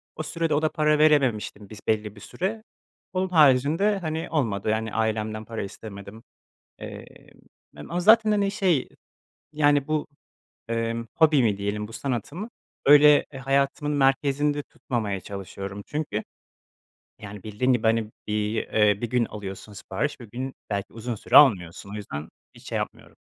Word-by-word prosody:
O 155 - -4
sürede 165 0 -1
o 145 - +2
da 155 - +2
para 150 -1 +2
verememiştim 130 -9 +2
bis 110 - -10
belli 105 -1 0
bir 100 - -14
süre. 215 +5 -4 0.5
Onun 185 0 0
haricinde, 155 +6 +4
hani, 160 -2 -3
olmadı, 110 -10 -1
yani, 110 0 -1
ailemden 110 -1 -1
para 115 0 -5
istemedim. 100 +2 -10 0.6
Emm, - - -8 0.7
mem 75 0 -11
a 175 - -1
zaten, 220 +3 +6
hani, 205 -2 +2
şey, 190 - +1 0.6
yani, 145 -2 +3
bu, 155 -1 0 0.6
emm, 115 0 -2
hobimi 140 -10 +4
diyelim, 100 +1 -3
bu - - -12
sanatımı 140 - -4 0.3
öyle 145 +1 +7
e 135 - -9
hayatımın 140 +2 0
merkezinde 145 +1 +2
tutmamaya 110 -9 -4
çalışıyorum 100 0 -7
çünkü, 145 -8 -3 1.0
yani, 105 -1 -9
bildiğin, 110 +5 0
gibi, 120 -2 +1
hani, 110 -1 +1 0.2
bir, 105 +1 -1 0.2
eee, 105 -2 +3
bir 120 - -3
gün 125 -1 +2
alıyorsun 105 -1 -8
sipariş, 140 +7 -4
bir 115 -3 -11
gün 130 +4 -5 0.2
belki 100 -1 -3
uzun 115 +1 -4
süre 115 +4 +1
almıyorsun 100 - +5
o - - -7
yüzden 80 -7 -6 0.3
hiç - - -13
şey - - -1
yapmıyorum. - - -6
120 Hz, 150 wpm, -25 LUFS, 105-150 Hz, 1.0 s, öyle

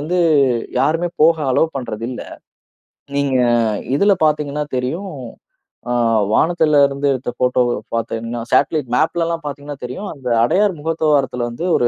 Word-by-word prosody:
வந்து 170 +5 -1 0.6
யாருமே 165 +3 +1
போக 165 +1 +5
அலோ 125 - +3
பண்றது 115 -4 -5
இல்ல. 125 - -6 0.9
நீங்க 140 -2 +1 0.6
இதில 200 +8 +3
பார்த்தீங்கன்னா 150 -1 0
தெரியும். 165 +10 -3 0.8
அ - - +1 0.4
வானத்தில 160 -2 +3
இருந்து 140 +1 -2
எடுத்த 130 -1 -4
ஃபோட்டோவ 125 -1 +2 0.2
பார்த்தீங்கன்னா, 115 +1 -3
சேட்டலைட் 140 -1 +2
மேப்லல்லாம் 165 +3 0
பார்த்தீங்கன்னா 145 0 -6
தெரியும். 135 +12 -6
அந்த 130 -3 -6
அடையார் 190 - +2
முகத்துவாரத்தில 145 -6 0
வந்து 140 +9 -5
ஒரு 120 - +2
145 Hz, 125 wpm, -18 LUFS, 125-165 Hz, 0.9 s, போக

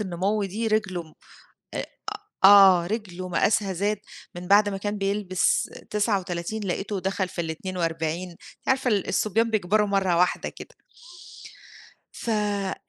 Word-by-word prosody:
النمو 200 +2 -1
دي 215 +4 -3
رجله 215 -5 0 0.7
آآ، - - -3 0.6
أ - - +10
آه 190 -4 +7
رجله 185 -4 -4
مقاسها 195 +2 +1
زاد 205 +4 0 0.4
من 175 0 -7
بَعد 205 +2 +5
ما 195 - -4
كان 205 +1 -3
بيلبس 195 -2 0 0.2
39 200 -1 -1
لقيته 195 +1 -3
دخل 190 0 -1
في 175 - -4
ال42. 165 0 -3
أنتِ 170 - -17 0.3
عارفة 265 -1 +2
الصبيان 215 +2 +1
بيكبروا 210 0 +2
مَرّة 190 -3 +1
واحدة 180 +1 +1
كده. - - -12 1.4
ف 235 - -5
أ 205 -3 -1
195 Hz, 130 wpm, -25 LUFS, 180-210 Hz, 1.4 s, أ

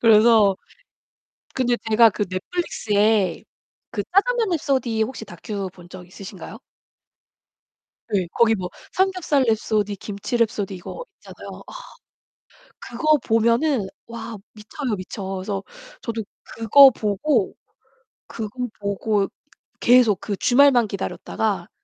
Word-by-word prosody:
그래서 220 -3 +5 1.0
근데 245 -2 +1
제가 230 +1 +7
그 210 - -3
Netflix에 205 - 0 0.5
그 205 - -2
짜장면 455 +3 +2
랩소디 260 -9 0
혹시 240 -1 -7
다큐 195 +2 -6
본 175 -1 -16
적 180 -1 -10
있으신가요? 190 +1 -10 1.6
예. 185 -3 0
거기 225 -1 +4
뭐 180 -3 -4 0.2
삼겹살 370 -7 +1
랩소디, 215 -3 0
김치 205 +4 -4
랩소디 220 -4 0
이거 190 - -8
있잖아요. - - -11
아. - - -11 1.1
그거 305 +6 +1
보면은 230 +1 +2 0.2
와 230 -1 -7 0.2
미쳐요, 220 +2 -4
미쳐. 190 +2 -7
그래서 195 +1 -4 0.4
저도 225 -2 -4 0.3
그거 265 +5 +7
보고 215 +2 0 0.7
그거 220 -2 -5 0.3
보고 200 0 0 0.5
계속 240 -5 +5
그 205 - -4
주말만 245 0 +4
기다렸다가 200 -1 -3
220 Hz, 250 characters per minute, -22 LUFS, 200-245 Hz, 1.6 s, 제가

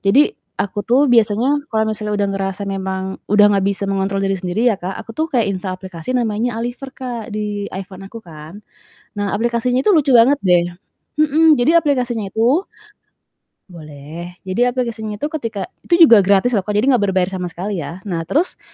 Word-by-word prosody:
Jadi 280 - +4 0.2
aku 205 +1 -3
tuh 260 +4 +4
biasanya 245 +4 +2
kalau 220 -1 0
misalnya 210 -1 -3
udah 205 -1 0
ngerasa 195 0 -3
memang 190 -1 -3 0.3
udah 210 +1 +5
nggak 195 -1 +1
bisa 200 0 -2
mengontrol 195 0 -1
diri 195 -1 -1
sendiri, 215 +7 +1
ya, 200 - -6
Kak. 185 +2 -5
Aku 225 - -10
tuh 315 +7 -2
kayak 245 -6 +1
instal 185 0 -4
aplikasi 185 +5 -5
namanya 230 0 -1
Aliver, 245 +4 -5
Kak, 245 -4 -7
di 210 -1 -4
iPhone 190 0 -8
aku 225 0 -11
kan. 165 +5 -12 0.6
Nah 205 -1 -1
aplikasinya 240 +3 0
itu 415 - +4
lucu 285 -7 +4
banget 255 +5 +5
deh. 180 -5 +3 0.6
Mhm, 310 -1 +4
jadi 310 +8 +3
aplikasinya 250 -6 0
itu 250 - +2 1.1
Boleh. 160 +2 -10
Jadi 195 +7 +1
aplikasinya 235 -4 -3
itu 290 +9 -3
ketika 230 -10 -5 0.2
itu 340 -1 +6
juga 230 -4 +7
gratis 200 +4 +3
loh, 205 -6 +1
Kak. 210 - -2
Jadi 210 +4 +2
nggak 240 -5 +2
berbayar 185 -1 +1
sama 180 -1 -3
sekali, 185 +3 -4
ya. 170 +4 -7
Nah 170 -5 -4
terus 325 +6 0
210 Hz, 185 wpm, -18 LUFS, 190-245 Hz, 1.1 s, juga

